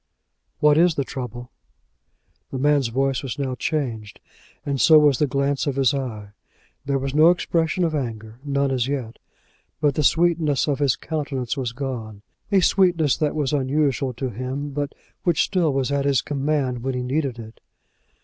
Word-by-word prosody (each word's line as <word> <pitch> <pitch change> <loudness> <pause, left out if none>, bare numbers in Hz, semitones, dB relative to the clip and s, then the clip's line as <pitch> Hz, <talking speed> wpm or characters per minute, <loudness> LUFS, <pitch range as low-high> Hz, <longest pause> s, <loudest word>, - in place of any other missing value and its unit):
"What 150 +1 +5
is 170 -2 +4
the 140 - 0
trouble?" 125 -2 -7 1.0
The 135 - -5
man's 145 -1 +2
voice 135 +3 0
was 130 -4 -5
now 135 -2 -2
changed, 120 -7 -3 0.5
and 140 -2 -1
so 160 - +7
was 145 -4 +4
the 150 - +2
glance 140 +1 0
of 140 - -1
his 135 -2 +3
eye. 115 -7 -4 0.5
There 140 0 0
was 135 0 -3
no 155 +3 +6
expression 170 0 +1
of 165 -2 0
anger, 115 -5 -5
none 140 -1 0
as 125 -2 0
yet; 130 -5 -4 0.6
but 145 -2 +2
the 150 - -1
sweetness 160 -3 +2
of 145 -2 0
his 140 -4 +2
countenance 140 -6 -3
was 130 -4 -3
gone, 115 -5 -6 0.3
a 195 -2 +4
sweetness 175 -6 +3
that 150 -2 -1
was 150 -2 -1
unusual 140 -1 0
to 125 +1 -4
him, 130 +5 -4
but 145 +1 -4 0.3
which 175 -4 +2
still 175 -6 +1
was 135 0 -1
at 140 -1 0
his 140 -3 +2
command 140 -3 -1
when 130 +1 -2
he 125 - -2
needed 135 -1 -1
it. 110 -1 -11
140 Hz, 175 wpm, -23 LUFS, 125-150 Hz, 1.0 s, so